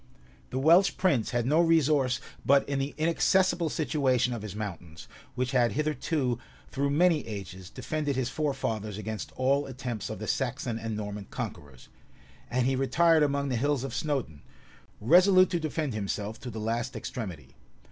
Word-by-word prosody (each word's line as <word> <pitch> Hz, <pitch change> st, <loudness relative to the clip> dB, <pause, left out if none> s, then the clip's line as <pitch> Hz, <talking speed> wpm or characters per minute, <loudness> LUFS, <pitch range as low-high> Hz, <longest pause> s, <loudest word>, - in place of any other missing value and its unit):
The -, -, -4 dB
Welsh 170 Hz, +8 st, +5 dB
prince 155 Hz, -, +2 dB
had 120 Hz, -1 st, -1 dB
no 150 Hz, +6 st, +4 dB
resource 150 Hz, -6 st, +3 dB, 0.2 s
but 140 Hz, 0 st, +4 dB
in 140 Hz, -1 st, -1 dB
the 135 Hz, +1 st, -3 dB
inaccessible 175 Hz, +1 st, +2 dB
situation 130 Hz, -6 st, +1 dB
of 115 Hz, -, -5 dB
his 105 Hz, -2 st, -7 dB
mountains, 85 Hz, -6 st, -7 dB, 0.3 s
which 125 Hz, 0 st, -1 dB
had 120 Hz, -3 st, +2 dB
hitherto, 145 Hz, -4 st, -1 dB, 0.3 s
through 140 Hz, +1 st, 0 dB
many 160 Hz, 0 st, +3 dB
ages, 95 Hz, -3 st, -7 dB
defended 150 Hz, -3 st, -3 dB
his 130 Hz, -2 st, 0 dB
forefathers 115 Hz, -8 st, -2 dB
against 110 Hz, 0 st, -5 dB
all 140 Hz, +2 st, +1 dB
attempts 125 Hz, -4 st, -5 dB
of -, -, -5 dB
the -, -, -6 dB
Saxon 115 Hz, -1 st, -2 dB
and 110 Hz, -1 st, -4 dB
Norman 105 Hz, -1 st, -5 dB
conquerors; 70 Hz, -4 st, -7 dB, 0.6 s
and 125 Hz, 0 st, +1 dB
he 135 Hz, +1 st, +2 dB
retired 160 Hz, +5 st, +3 dB
among 140 Hz, -1 st, +1 dB
the 125 Hz, -, 0 dB
hills 140 Hz, +1 st, 0 dB
of 135 Hz, -, -5 dB
Snowdun, 135 Hz, -, -2 dB, 0.6 s
resolute 185 Hz, -, +5 dB
to 175 Hz, -, 0 dB
defend 155 Hz, -3 st, -2 dB
himself 105 Hz, +1 st, -3 dB
to 125 Hz, -, -7 dB
the 110 Hz, -1 st, -6 dB
last 115 Hz, +4 st, -2 dB
extremity. 105 Hz, -7 st, -6 dB
130 Hz, 160 wpm, -28 LUFS, 110-150 Hz, 0.6 s, Welsh